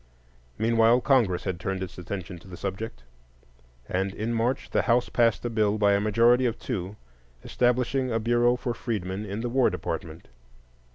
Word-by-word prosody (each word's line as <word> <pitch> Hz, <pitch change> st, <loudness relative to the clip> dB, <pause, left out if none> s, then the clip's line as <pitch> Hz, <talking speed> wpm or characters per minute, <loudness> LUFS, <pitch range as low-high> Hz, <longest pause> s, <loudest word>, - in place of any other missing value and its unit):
Meanwhile 115 Hz, +2 st, +4 dB
Congress 115 Hz, -11 st, +2 dB
had 95 Hz, -3 st, -3 dB
turned 95 Hz, +1 st, -3 dB
its 95 Hz, -, -8 dB
attention 90 Hz, 0 st, -6 dB
to 90 Hz, -, -17 dB
the 90 Hz, -1 st, -9 dB
subject; 95 Hz, -, -5 dB, 0.8 s
and 95 Hz, +1 st, -2 dB
in 115 Hz, +2 st, -2 dB
March 115 Hz, +3 st, -1 dB
the -, -, +2 dB
House 120 Hz, 0 st, +2 dB
passed 115 Hz, -3 st, +2 dB
a -, -, 0 dB
bill 110 Hz, -2 st, +1 dB
by 100 Hz, -1 st, +3 dB
a 100 Hz, -, +2 dB
majority 115 Hz, +4 st, +4 dB
of 115 Hz, -1 st, -2 dB
two 100 Hz, -5 st, -4 dB, 0.5 s
establishing 125 Hz, +1 st, +1 dB
a 115 Hz, -, +1 dB
Bureau 120 Hz, +2 st, +3 dB
for 125 Hz, -1 st, -3 dB
Freedmen 105 Hz, -4 st, -4 dB
in 100 Hz, +3 st, -4 dB
the 120 Hz, -, -2 dB
War 130 Hz, +1 st, +3 dB
Department. 80 Hz, +1 st, -5 dB
110 Hz, 170 wpm, -26 LUFS, 95-120 Hz, 0.8 s, Meanwhile